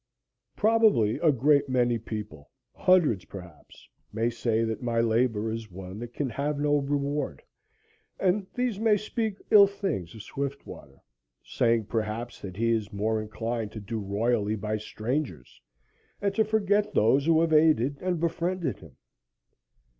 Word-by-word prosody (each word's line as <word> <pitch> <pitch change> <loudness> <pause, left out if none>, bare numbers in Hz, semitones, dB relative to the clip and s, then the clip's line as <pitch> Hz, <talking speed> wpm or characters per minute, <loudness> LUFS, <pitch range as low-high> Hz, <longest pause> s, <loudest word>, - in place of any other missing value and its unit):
Probably 215 - +3
a 160 - +4
great 140 +2 +3
many 120 -2 +2
people 105 -9 -7 0.2
hundreds, 160 - +3
perhaps 90 -5 -13 0.2
may 115 +2 0
say 115 -1 0
that 110 -1 -3
my 120 -2 0
labor 115 -1 +1
is 115 -1 -5
one 95 +2 -9
that 120 0 -7
can 140 +3 -2
have 145 +3 -2
no 145 0 +2
reward, 145 +1 -2 0.8
and 195 +1 +1
these 245 -5 -1
may 220 -2 +3
speak 215 0 -3
ill 205 -2 +9
things 195 - -4
of 110 - -9
Swiftwater, 135 - -7 0.4
saying, 115 -2 +1
perhaps, 110 +2 -4
that 95 -2 -8
he 115 +1 +1
is 110 -3 -1
more 110 +2 -1
inclined 115 0 -4
to 110 - -6
do 110 +2 -5
royally 105 +1 0
by 105 +1 -3
strangers 110 - -4 0.6
and 200 -1 0
to 220 - +3
forget 210 -1 +1
those 135 +7 +3
who 165 -1 +5
have 165 -1 +1
aided 150 -3 +3
and 180 -2 -1
befriended 170 +1 -1
him. 80 -7 -16
120 Hz, 145 wpm, -27 LUFS, 110-165 Hz, 0.8 s, ill